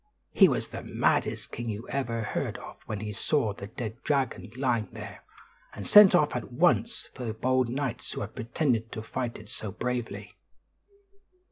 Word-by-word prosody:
He - - +7
was - - -1
the - - -6
maddest - - 0
king 120 0 -4
you 110 +2 -5
ever 120 -4 -1
heard - - -2
of - - -11
when 105 -2 -4
he 105 -1 -4
saw 110 0 +1
the 100 0 -8
dead 115 +1 -6
dragon 135 -5 0
lying 125 -6 0
there, - - -9 0.5
and 100 - -6
sent 205 -3 +9
off 150 -5 +3
at 125 - -4
once 175 - +2
for 130 - -7
the 110 -2 -3
bold 130 +1 +1
knights 130 -1 -3
who - - -4
had 100 +2 -5
pretended 115 -1 -1
to 110 - -5
fight 120 +1 -3
it 105 0 -13
so 105 - -4
bravely. 125 +3 -4
120 Hz, 175 wpm, -28 LUFS, 110-130 Hz, 0.5 s, sent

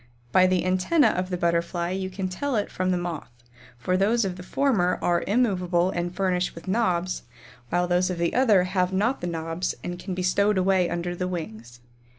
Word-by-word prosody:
By 185 +7 +5
the 185 -1 +1
antennæ 185 - +3
of 185 0 -2
the 180 - -2
Butterfly 170 0 0
you 190 0 -3
can 190 0 -3
tell 255 +9 -3
it 210 - -1
from, 185 0 -1
the 180 - +2
Moth, 175 -3 -5 0.5
for 180 +9 -1
those 210 +4 +2
of 185 -2 -3
the 180 - -9
former 185 -3 +1
are 175 -1 +1
immovable 185 -5 +1
and 175 -1 -2
furnished 180 -1 -1
with 165 - -11
knobs, 185 -4 0 0.5
while 175 +1 +1
those 180 +1 +2
of 180 - -3
the 170 0 0
other 220 -8 +4
have 185 0 0
not 215 +8 0
the 175 - -3
knobs 165 +1 -3
and 175 0 -5
can 185 0 -5
be 185 - -3
stowed 200 +3 +2
away 185 -1 +2
under 175 +1 -3
the 180 +1 -2
wings. 120 -9 -7
185 Hz, 200 wpm, -25 LUFS, 175-190 Hz, 0.5 s, By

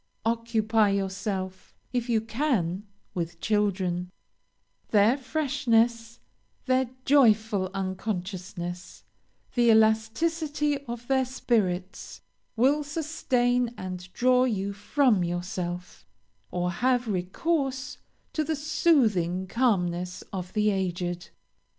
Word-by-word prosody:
Occupy 225 -2 +2
yourself, 190 -1 -3 0.2
if 245 -1 -1
you 225 -2 +3
can, 220 - -1 0.3
with 170 -1 -4
children; 190 -4 0 0.8
their 215 +3 +5
freshness, 245 -5 0 0.5
their 260 -1 +2 0.2
joyful 220 -8 +4
unconsciousness, 185 -2 -4 0.5
the 240 -2 +3
elasticity 285 +8 +2
of 240 -1 -7
their 265 -1 +3
spirits, 200 -7 -1 0.4
will 275 +6 +3
sustain 250 -6 0
and 185 -1 -6
draw 255 +3 +3
you 200 -4 -1
from 210 0 +2
yourself, 175 0 -4 0.5
or 180 0 -1
have 245 +5 +1
recourse 265 - -1 0.3
to 310 - 0
the 315 +1 -1
soothing 225 - +2
calmness 180 -6 0
of 180 -1 -4
the 210 -1 +2
aged. 175 -2 -2
220 Hz, 95 wpm, -27 LUFS, 185-255 Hz, 0.8 s, their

